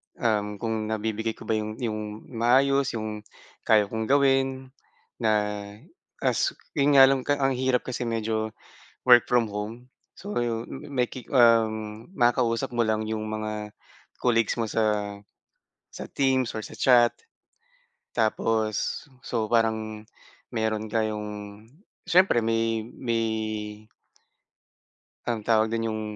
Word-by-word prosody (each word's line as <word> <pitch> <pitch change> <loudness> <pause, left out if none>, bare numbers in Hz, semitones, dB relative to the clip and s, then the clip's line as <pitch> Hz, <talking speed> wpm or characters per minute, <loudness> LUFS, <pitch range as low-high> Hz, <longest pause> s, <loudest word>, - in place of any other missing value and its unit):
Um, 105 -2 0
kung 110 0 -3
nabibigay 110 +1 -2
ko - - -12
ba 110 - 0
yung 110 0 -4
yung 110 -2 -4
maayos, 130 +3 +3
yung 110 -1 -4 0.5
kaya 110 -2 +6
kong 110 +2 -4
gawin, 135 -1 +2 0.5
na 110 -3 +2 0.9
as - - +1 0.2
yun 145 0 +2
nga 135 - +10
lang 135 0 +5 0.2
ang 135 -1 +1
hirap 130 -1 +1
kasi 125 -1 -4
medyo 110 -1 -2 0.5
work 120 -1 +8
from 120 -2 +2
home. 105 +4 -6 0.3
So, 205 +2 -6
yun 115 -1 -1 0.2
may 125 -3 +1
ki 130 - -9
um, 110 - +3
makakausap 120 - +1
mo 120 - +3
lang 110 0 -1
yung 110 -1 -2
mga 110 -1 -4 0.5
colleagues 115 -1 +2
mo 115 - -1
sa 105 -2 0 0.8
sa - - -8
Teams 130 -3 +1
or - - -4
sa - - -11
chat. 120 -2 +5 1.0
Tapos, 110 0 0 0.2
so, 110 -3 -2
parang 110 -2 0 0.5
meron 110 -1 -2
kayong 110 -2 -1 0.8
siyempre 180 -9 +4
may 115 -1 0
may 115 -1 -2 2.0
anong 115 -2 -1
tawag 110 0 +2
dun, 115 0 -1
yung 110 0 -3
115 Hz, 125 wpm, -26 LUFS, 110-125 Hz, 2.0 s, nga